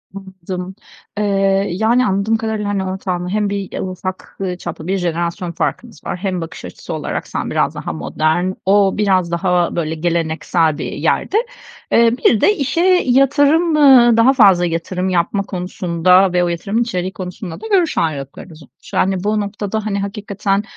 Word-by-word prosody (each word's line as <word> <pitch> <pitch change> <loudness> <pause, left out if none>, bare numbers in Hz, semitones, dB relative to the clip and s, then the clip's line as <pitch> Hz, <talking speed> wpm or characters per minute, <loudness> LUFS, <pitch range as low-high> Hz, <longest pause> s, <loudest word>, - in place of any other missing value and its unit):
Anladım, 190 -1 -7 0.4
eee, 195 -1 +1
yani 230 +7 +2
anladığım 200 +3 +1
kadarıyla, 220 -2 -3
hani, 195 -2 -1
ortağınla 185 -1 -3
hem 210 0 0
bir 200 -1 -4
ufak, 185 0 -6
ııı, 180 -2 -2
çaplı 170 -1 -7
bir 195 +1 0
jenerasyon 175 +1 -2
farkınız 235 +7 -4
var. - - -4
Hem 185 -2 -3
bakış 165 - -8
açısı - - -8
olarak - - -4
sen - - -4
biraz - - 0
daha - - -5
modern, 155 - -1
o 195 0 +3
biraz 185 -4 +1
daha 175 0 0
böyle 160 -1 -2
geleneksel 165 -1 0
bir - - -4
yerde. 420 - 0 0.5
Eee, 230 0 +5
bir 220 - +4
de 420 - +4
işe 290 +2 -1 0.2
yatırım, 285 +5 +3
ııı, 250 -6 +6
daha 250 +4 +5
fazla 195 -8 +5
yatırım 180 +3 -2
yapma 185 +3 0
konusunda 180 0 +1
ve 180 0 +2
o - - +1
yatırımın 195 +7 -1
içeriği 185 -5 -2
konusunda 180 -1 -7
da 445 - -6
görüş 370 -7 +1
ayrılıklarınız 155 +1 -4
olmuş. - - -19
Yani 190 0 +1
bu 215 +1 0
noktada 205 +1 -4
hani 200 -1 -1
hakikaten, 200 0 -2
190 Hz, 160 wpm, -17 LUFS, 175-215 Hz, 0.5 s, ııı